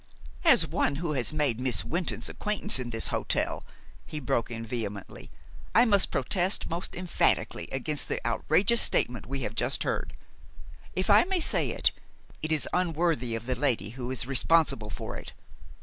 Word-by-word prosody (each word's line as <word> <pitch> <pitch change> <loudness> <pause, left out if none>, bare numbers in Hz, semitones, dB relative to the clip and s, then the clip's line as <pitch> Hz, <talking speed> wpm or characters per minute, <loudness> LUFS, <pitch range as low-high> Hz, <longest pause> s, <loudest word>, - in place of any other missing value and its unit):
"As - - +6
one 140 - 0
who 160 +1 -2
has 130 -1 +1
made 145 -7 0
Miss 130 -1 -1
Wynton's 175 +1 -2
acquaintance 210 -5 +1
in 125 -1 -4
this 115 -1 -2
hotel," - - -1 0.4
he 155 - -6
broke 120 -4 -1
in 115 -1 -5
vehemently, 105 -4 -6 0.5
"I 235 - +7
must 200 -4 +3
protest 180 +8 0
most 170 +2 -4
emphatically 180 -1 0
against 145 +3 -2
the - - -1
outrageous 180 - +3
statement 120 -1 0
we 135 +1 -3
have 110 -2 -3
just 110 - 0
heard. - - -2 0.8
If 185 +2 +1
I 205 - +7
may 380 0 0
say 320 - +1
it, - - +2 0.5
it 155 - -2
is 155 -2 +1
unworthy 165 -9 +1
of 115 0 -6
the 130 - 0
lady 120 -5 0
who 125 0 -6
is 130 -2 -1
responsible 135 -4 +2
for - - -6
it. - - -9
140 Hz, 165 wpm, -28 LUFS, 120-175 Hz, 0.8 s, I